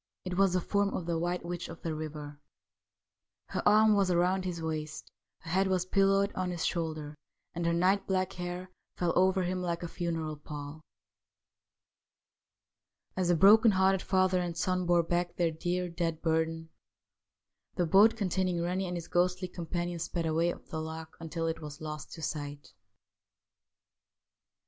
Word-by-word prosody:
It 180 -1 -3
was 195 -1 +3
the 185 - +2
form 200 +2 +1
of 180 - -3
the 170 -1 -1
White 175 +1 -2
Witch 175 0 -4
of 165 - -10
the 165 - -2
River; 150 -2 -6 1.1
her - - -2
arm 215 +1 +6
was 195 -2 +2
round 180 +2 +2
his 175 -2 -3
waist, 155 -1 -4 0.3
her 165 - -8
head 190 +2 +3
was 185 -1 +1
pillowed 195 +1 +3
on 185 -1 -2
his 175 -2 -2
shoulder, 155 -3 -2 0.4
and 170 0 -2
her - - +3
night 185 +4 +2
black 185 -1 0
hair 180 +1 -5 0.3
fell 175 -2 +1
over 185 +1 +3
him 180 +1 -2
like 170 -1 -2
a - - -2
funeral 165 -3 -3
pall. 150 +1 -8 2.3
As 185 -1 0
the 175 - +4
broken 215 +7 +7
hearted 190 -1 +3
father 185 -1 +2
and 170 -1 -4
son 185 +1 0
bore 175 -1 +4
back 175 +1 -1
their 170 -2 +1
dear, 180 +3 -2
dead 170 -2 -3
burden, 160 0 0 1.1
the 180 - +1
boat 205 +7 +6
containing 185 -3 0
Rennie 180 +2 -1
and 175 0 -3
his 170 - -7
ghostly 180 +1 +1
com 170 -2 -7
panion 175 0 -2
sped 170 0 -2
away 165 +2 +2
up - - -10
the 160 - -5
loch 160 0 -7
until 165 0 -4
it 165 0 -2
was 150 0 -8
lost 150 -2 -6
to 160 - -8
sight. 145 -3 -5
175 Hz, 170 wpm, -30 LUFS, 160-185 Hz, 2.3 s, broken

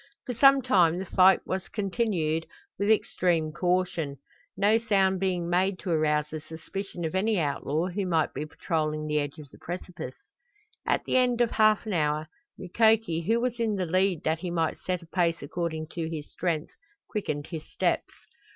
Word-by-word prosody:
For 250 - -3
some 275 +2 +6
time 175 -9 +4
the 190 - -4
flight 190 +1 +5
was 190 0 -3
continued 185 -7 -1 0.3
with 200 +1 +1
extreme 175 -7 +2
caution, 175 -4 0 0.4
no 210 +3 +4
sound 195 -4 +2
being 180 -3 0
made 185 +2 +1
to 180 - -4
arouse 150 -2 +2
the 155 -1 -5
suspicion 175 +3 -6
of 160 - -3
any 205 +2 +1
outlaw 150 +1 -1
who 190 +1 -2
might 165 -3 +1
be 150 +3 -4
patrolling 155 -1 -2
the 150 0 +1
edge 145 +1 -4
of 150 -2 -10
the - - -16
precipice. 175 -5 -6 0.7
At - - +1
the - - +2
end 250 -2 +2
of 240 -2 +3
half 215 0 +3
an 215 - -3
hour 155 -1 0 0.3
Mukoki, 220 -2 +2
who 230 +2 +3
was 245 0 -2
in 225 -2 +1
the 185 -2 -1
lead 185 0 +1
that 160 +1 0
he 180 +1 -4
might 165 -2 -1
set 180 -2 -3
a - - -13
pace 170 -1 0
according 160 +1 -3
to 165 -2 -4
his 155 -3 -6
strength, 165 -3 -2 0.3
quickened 150 -9 -3
his 160 -2 -7
steps. - - 0
175 Hz, 180 wpm, -27 LUFS, 160-200 Hz, 0.7 s, some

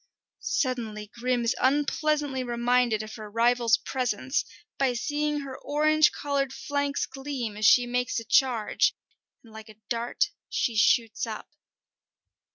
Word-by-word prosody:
Suddenly 220 -6 -2
Grim 245 0 -1
is 230 - +1
unpleasantly 290 0 +1
reminded 240 -2 +1
of 215 0 -9
her 215 -1 -8
rival's 235 +1 +3
presence 255 +1 -2 0.4
by 265 -2 +2
seeing 295 +4 -1
her 270 -2 -7
orange 305 +1 +3
coloured 280 -2 -2
flanks 285 0 -2
gleam 270 -6 -5
as 210 0 +2
she 245 - +6
makes 245 0 -1
a - - -7
charge, 240 -3 +2 0.5
and 225 -2 -17
like 220 0 -11
a 215 - -13
dart 235 - -1 0.2
she 235 - -1
shoots 225 +1 +2
up. 220 -1 -7
250 Hz, 135 wpm, -27 LUFS, 230-280 Hz, 0.5 s, she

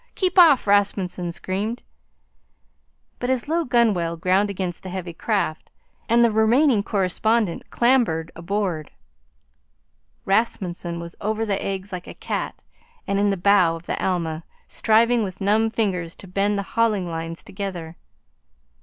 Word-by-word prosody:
Keep 370 -1 +2
off!" 310 -7 +7
Rasmunsen 195 -3 +1
screamed. 205 +7 -3 1.4
But 245 - -2
his 260 0 0
low 335 +2 +1
gunwale 210 - +1
ground 185 +4 +2
against 185 -3 -4
the 190 - -8
heavy 180 -2 -5
craft, 195 -3 -2 0.4
and 235 +1 +5
the 230 - +2
remaining 225 +3 +4
correspondent 205 0 0
clambered 235 -11 +2
aboard. 175 -3 -2 1.4
Rasmunsen 185 -5 -1
was 170 0 -8
over 220 +2 -1
the 200 -2 -1
eggs 195 0 -4
like 180 -1 -6
a - - -9
cat - - -4 0.4
and 200 0 0
in 205 0 +3
the 195 - 0
bow 180 -3 +4
of 165 +1 -11
the - - -3
Alma, 165 -3 -1 0.2
striving 230 +2 +3
with 190 -2 -6
numb 215 +3 +2
fingers 185 -7 -1
to 195 - -12
bend 200 +3 0
the 200 - -1
hauling 215 -5 +1
lines 165 0 -5
together. 180 -5 -6
200 Hz, 140 wpm, -23 LUFS, 175-220 Hz, 1.4 s, off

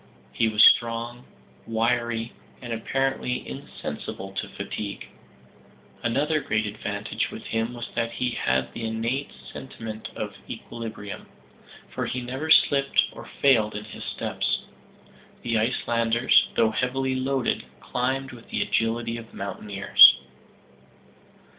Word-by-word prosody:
He 115 - +1
was 105 0 +6
strong, 120 +1 +4 0.4
wiry, 115 0 0 0.3
and 120 -2 -5
apparently 135 +2 -1
insensible 95 +1 -7
to 95 - -4
fatigue. 100 -2 -5 1.0
Another 145 +7 +1
great 110 -3 0
advantage 105 0 -3
with - - -9
him 115 +2 -2
was 120 - -5
that 115 0 -1
he 125 +1 -1
had 65 - 0
the 115 - -6
innate 115 +5 -2 0.2
sentiment 110 -4 -7
of - - -4 0.2
equilibrium 110 -3 -7 0.7
for - - -2
he 125 - -2
never 130 +5 -5
slipped 140 -3 +5
or - - -11
failed 110 -7 +4
in 105 - -4
his 105 - -9
steps. - - -1 0.8
The 115 -2 +1
Icelanders, 115 +1 +3
though 115 -1 +3
heavily 130 +3 0
loaded, 130 -1 0
climbed 130 +2 -2
with 120 -2 -13
the - - 0
agility 115 +1 0
of 115 -1 -11
mountaineers. 100 +1 +6
115 Hz, 120 wpm, -25 LUFS, 110-125 Hz, 1.0 s, was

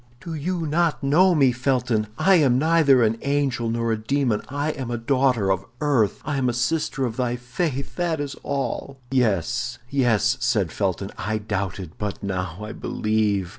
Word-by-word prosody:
"Do 170 +1 -7
you 165 +2 -2
not 160 0 +1
know 175 +6 +4
me, 135 -4 +5
Felton? 125 -3 0
I 195 - +4
am 135 -6 +4
neither 150 -4 +4
an 115 +1 +1
angel 140 -5 0
nor 115 0 0
a 110 - +1
demon; 130 -3 +1
I 145 +3 -1
am 130 -5 -5
a 120 - -2
daughter 125 -4 +2
of 95 0 0 0.2
earth, 130 -8 +1
I 145 -2 -1
am 130 -2 +1
a - - -1
sister 135 +2 0
of 115 -2 -4
thy 125 -2 0
faith, 135 +3 -3
that 170 -3 0
is 145 -1 -4
all." 140 0 -3
"Yes, 120 0 0
yes!" 120 -2 +2
said 105 -9 +1
Felton, 95 0 -2
"I 110 +1 -1
doubted, 100 -4 -4
but 105 -1 -4
now 90 -3 -3
I 110 - -6
believe." 105 -4 0
125 Hz, 175 wpm, -23 LUFS, 110-140 Hz, 0.2 s, me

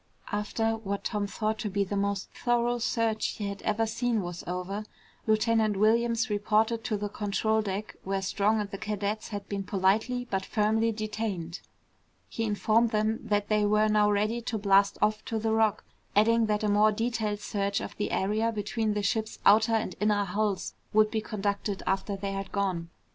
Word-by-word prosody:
After 225 +2 0
what 200 -2 -4
Tom 205 -2 -1
thought 215 +1 -2
to 210 - -2
be 200 +1 +1
the 200 +1 -4
most 200 -1 -1
thorough 240 0 0
search 225 -1 0
he 205 - -3
had 200 0 -7
ever 215 +1 +1
seen 225 -1 0
was 175 0 -6
over, 180 +4 -3 0.4
Lieutenant 220 -1 +2
Williams 230 +3 +3
reported 215 +2 +1
to 215 - 0
the 205 +1 -3
control 215 +2 0
deck 205 0 -4
where 195 0 -2
Strong 210 +3 +1
and 205 -1 -5
the 195 - -6
cadets 210 0 -2
had 205 -2 -6
been 200 -1 -3
politely 210 +6 +1
but 195 -3 -1
firmly 220 +3 +1
detained. 210 -6 -4 0.7
He 225 - -3
informed 220 +2 +2
them 215 0 0
that 205 -1 0
they 210 -1 +2
were 210 +1 +3
now 210 -1 +4
ready 210 +3 +1
to 230 -1 -3
blast 200 -1 +3
off 215 +1 +1
to 225 - -2
the 220 0 0
Rock, 220 -1 +2 0.3
adding 225 +2 +4
that 210 0 0
a - - +2
more 210 +1 +4
detailed 220 -1 -1
search 200 -1 -1
of - - -6
the 205 - -1
area 215 +4 +1
between 215 0 -1
the 205 - -1
ship's 220 +2 -1
outer 220 +3 +6
and 215 -4 -1
inner 210 -1 +2
hulls 200 +1 -1 0.2
would 215 0 +4
be 220 - 0
conducted 200 -1 -2
after 195 +1 -1
they 195 0 -3
had 195 -1 -5
gone. 185 -4 -1
210 Hz, 185 wpm, -28 LUFS, 200-220 Hz, 0.7 s, outer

